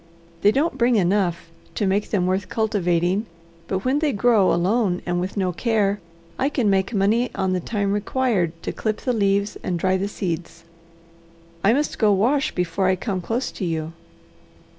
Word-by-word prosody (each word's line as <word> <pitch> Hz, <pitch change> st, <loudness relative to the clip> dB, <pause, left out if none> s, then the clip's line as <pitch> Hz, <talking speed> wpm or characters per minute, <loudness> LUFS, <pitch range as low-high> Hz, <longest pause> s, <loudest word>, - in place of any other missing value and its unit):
They 205 Hz, -, +5 dB
don't 275 Hz, +3 st, 0 dB
bring 240 Hz, 0 st, +3 dB
enough 180 Hz, -4 st, +1 dB, 0.2 s
to 210 Hz, -, 0 dB
make 195 Hz, +2 st, 0 dB
them 185 Hz, -4 st, +1 dB
worth 185 Hz, +1 st, -1 dB
cultivating, 190 Hz, -2 st, 0 dB, 0.4 s
but 190 Hz, +3 st, -3 dB
when 265 Hz, +3 st, +2 dB
they 305 Hz, -2 st, +1 dB
grow 215 Hz, -3 st, +3 dB
alone 185 Hz, +1 st, +1 dB
and 175 Hz, 0 st, -1 dB
with 185 Hz, +3 st, -4 dB
no 185 Hz, -2 st, +1 dB
care, 205 Hz, 0 st, 0 dB, 0.4 s
I 270 Hz, -, +2 dB
can 240 Hz, -8 st, +1 dB
make 190 Hz, +1 st, +1 dB
money 225 Hz, +4 st, +2 dB
on 190 Hz, -1 st, 0 dB
the 185 Hz, -, 0 dB
time 200 Hz, +1 st, -1 dB
required 205 Hz, -6 st, 0 dB
to -, -, -2 dB
clip 215 Hz, -1 st, -3 dB
the 250 Hz, -, 0 dB
leaves 200 Hz, -1 st, +1 dB
and 180 Hz, -, -2 dB
dry 185 Hz, +2 st, +1 dB
the 195 Hz, +2 st, -2 dB
seeds. 170 Hz, -4 st, -5 dB, 1.0 s
I 200 Hz, -, +5 dB
must 295 Hz, +3 st, -1 dB
go 215 Hz, -2 st, +4 dB
wash 250 Hz, +9 st, +2 dB
before 180 Hz, +1 st, 0 dB
I 185 Hz, -, +3 dB
come 185 Hz, 0 st, -3 dB
close 230 Hz, +8 st, -2 dB
to -, -, -7 dB
you." 160 Hz, -2 st, -2 dB
200 Hz, 180 wpm, -22 LUFS, 185-225 Hz, 1.0 s, They